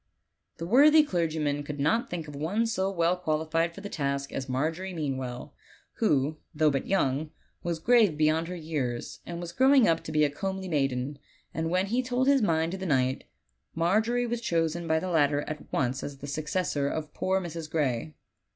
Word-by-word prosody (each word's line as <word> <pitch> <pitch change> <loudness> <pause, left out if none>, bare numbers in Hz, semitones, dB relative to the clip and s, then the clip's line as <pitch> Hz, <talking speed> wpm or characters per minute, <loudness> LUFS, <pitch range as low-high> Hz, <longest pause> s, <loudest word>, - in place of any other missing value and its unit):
The 165 - -5
worthy 295 - +7
clergyman 155 - -1
could 145 0 -6
not 220 +12 +1
think 165 -3 -4
of 145 - -9
one 180 +11 0
so 195 -4 0
well 170 -2 +1
qualified 165 0 -1
for 200 - -9
the 205 - -5
task 140 -4 -2
as 130 0 -4
Margery 165 +8 -2
Meanwell, 130 -5 -4 0.4
who, 150 - +1 0.2
though 155 0 +4
but 135 - -2
young, 150 -5 +1 0.3
was 170 -1 -2
grave 215 -3 +4
beyond 155 +2 +2
her 180 - -5
years, 150 -8 -4
and 170 -1 -5
was 175 -1 -6
growing 265 +4 +5
up 165 0 +2
to - - -5
be 155 0 +3
a 150 - +3
comely 190 +4 -4
maiden; 135 -3 -1 0.3
and 160 +1 -2
when 185 +2 +1
he 235 +5 0
told 255 +1 0
his 280 -1 +5
mind 165 -4 +1
to 190 - -5
the 190 - -4
knight, 130 -3 +1 0.5
Margery 220 +9 +2
was 240 0 -2
chosen 165 -4 0
by 160 0 +2
the 185 +2 -4
latter 145 -3 +3
at 150 0 -7
once 130 0 0
as 140 -1 -6
the 135 - -9
successor 155 0 -1
of 155 0 -4
poor 190 +1 0
Mrs. 165 -3 -6
Gray. 150 -2 -1
160 Hz, 190 wpm, -28 LUFS, 145-190 Hz, 0.5 s, worthy